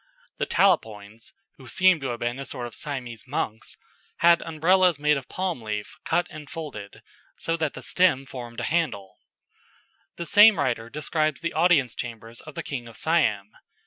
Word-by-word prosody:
The -, -, -1 dB
Talapoins 110 Hz, -, 0 dB, 0.3 s
(who 130 Hz, -, -14 dB
seem 185 Hz, +6 st, +4 dB
to 135 Hz, -, -4 dB
have 120 Hz, -2 st, -4 dB
been 120 Hz, +2 st, -2 dB
a 140 Hz, -, -5 dB
sort 125 Hz, -3 st, -5 dB
of 120 Hz, -, -8 dB
Siamese 125 Hz, -6 st, -5 dB
monks) 110 Hz, -5 st, -4 dB, 0.4 s
had 170 Hz, 0 st, +5 dB
Umbrellas 175 Hz, +2 st, +3 dB
made 150 Hz, +1 st, +2 dB
of 135 Hz, -2 st, -4 dB
a -, -, -45 dB
palm 185 Hz, -8 st, -3 dB
leaf 105 Hz, -1 st, -5 dB
cut 175 Hz, +2 st, +1 dB
and 155 Hz, -3 st, -10 dB
folded, 135 Hz, -11 st, -8 dB, 0.3 s
so 165 Hz, -, -1 dB
that 155 Hz, -3 st, -2 dB
the -, -, -8 dB
stem 180 Hz, -7 st, +3 dB
formed 120 Hz, -3 st, -8 dB
a -, -, -3 dB
handle. 145 Hz, -, -2 dB, 1.0 s
The 170 Hz, -, -5 dB
same 205 Hz, +2 st, +7 dB
writer 120 Hz, -5 st, -1 dB
describes 155 Hz, +2 st, -1 dB
the 170 Hz, -, -3 dB
audience 160 Hz, -7 st, +3 dB
chamber 115 Hz, -1 st, -7 dB
of 155 Hz, -, -10 dB
the -, -, -4 dB
King 125 Hz, -4 st, -5 dB
of 115 Hz, -, -10 dB
Siam. 110 Hz, -12 st, +1 dB
140 Hz, 175 wpm, -25 LUFS, 120-165 Hz, 1.0 s, same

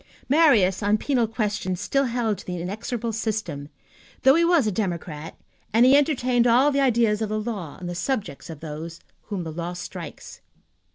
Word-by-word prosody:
Marius, 245 Hz, -, +4 dB
on 205 Hz, +1 st, +2 dB
penal 245 Hz, -1 st, +1 dB
questions, 210 Hz, -5 st, -2 dB
still 275 Hz, +7 st, +1 dB
held 230 Hz, -5 st, -1 dB
to -, -, -11 dB
the 180 Hz, -1 st, -4 dB
inexorable 220 Hz, +5 st, -4 dB
system, 210 Hz, -10 st, -3 dB, 0.5 s
though 265 Hz, -, +7 dB
he 335 Hz, +3 st, +3 dB
was 335 Hz, -6 st, +4 dB
a 215 Hz, -, +1 dB
democrat 170 Hz, -6 st, -4 dB, 0.4 s
and 230 Hz, +3 st, +6 dB
he 260 Hz, +2 st, +7 dB
entertained 255 Hz, -4 st, +2 dB
all 255 Hz, +5 st, +5 dB
the 280 Hz, -, +1 dB
ideas 230 Hz, -5 st, +2 dB
of 220 Hz, -, -1 dB
the 215 Hz, 0 st, -1 dB
law 210 Hz, -9 st, -5 dB
on 180 Hz, -, -8 dB
the 175 Hz, -, -4 dB
subject 195 Hz, -, -3 dB
of 160 Hz, -3 st, -9 dB
those 160 Hz, +2 st, -7 dB, 0.3 s
whom 200 Hz, -4 st, -4 dB
the 160 Hz, -, -5 dB
law 170 Hz, +2 st, -4 dB
strikes. 175 Hz, -1 st, -8 dB
215 Hz, 180 wpm, -24 LUFS, 175-245 Hz, 0.5 s, though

